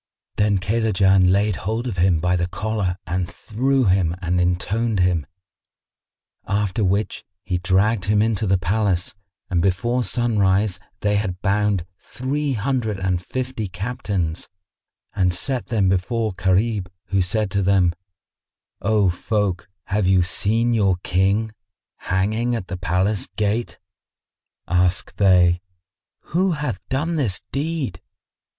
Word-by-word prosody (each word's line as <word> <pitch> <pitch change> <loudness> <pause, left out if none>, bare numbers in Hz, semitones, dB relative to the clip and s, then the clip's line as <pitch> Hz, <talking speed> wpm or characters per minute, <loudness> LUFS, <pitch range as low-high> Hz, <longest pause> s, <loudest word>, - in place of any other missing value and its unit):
Then 105 -1 +3
Kaylajan 95 -2 +3
laid 100 0 +2
hold 110 +4 -2
of 115 -7 -3
him 85 -2 +3
by 90 +2 +1
the 85 -1 0
collar 105 -2 -2
and 90 0 -2
threw 130 +4 0
him 90 -3 +2
and 90 -1 0
pinioned 100 +5 0
him; 90 -5 +1 1.2
after 100 +1 0
which 100 +3 0 0.2
he 90 -3 -1
dragged 95 +3 +2
him 105 0 +2
into 110 -1 +1
the 95 0 +3
palace 90 0 0 0.4
and 85 -2 +2
before 110 +7 +1
sunrise 105 -5 +1 0.2
they 105 0 +2
had 95 -3 -2
bound 100 -3 +1
three 140 +3 -2
hundred 110 -3 -1
and 90 -2 -1
fifty 125 -2 -4
Captains 95 -4 -3 0.6
and 90 -2 +1
set 130 +6 -2
them 105 -5 +1
before 110 +3 0
Gharib, 95 +1 +1 0.2
who 100 -1 +2
said 100 +2 -1
to 100 - +1
them, 95 -3 +3 0.9
"O 105 -1 +2
folk, 100 +1 -2
have 100 -1 0
you 95 -1 +4
seen 115 +6 +1
your 100 -5 +3
King 100 +4 +1 0.5
hanging 110 +6 0
at 100 -5 -5
the 95 - -4
palace 90 +3 0
gate?" 105 +3 -1 0.9
Asked 90 +1 +1
they, 90 -3 +4 0.7
"Who 185 +2 +2
hath 145 - -3
done 155 +5 -1
this 115 -11 0
deed?" 140 - -2
100 Hz, 130 wpm, -22 LUFS, 90-110 Hz, 1.2 s, you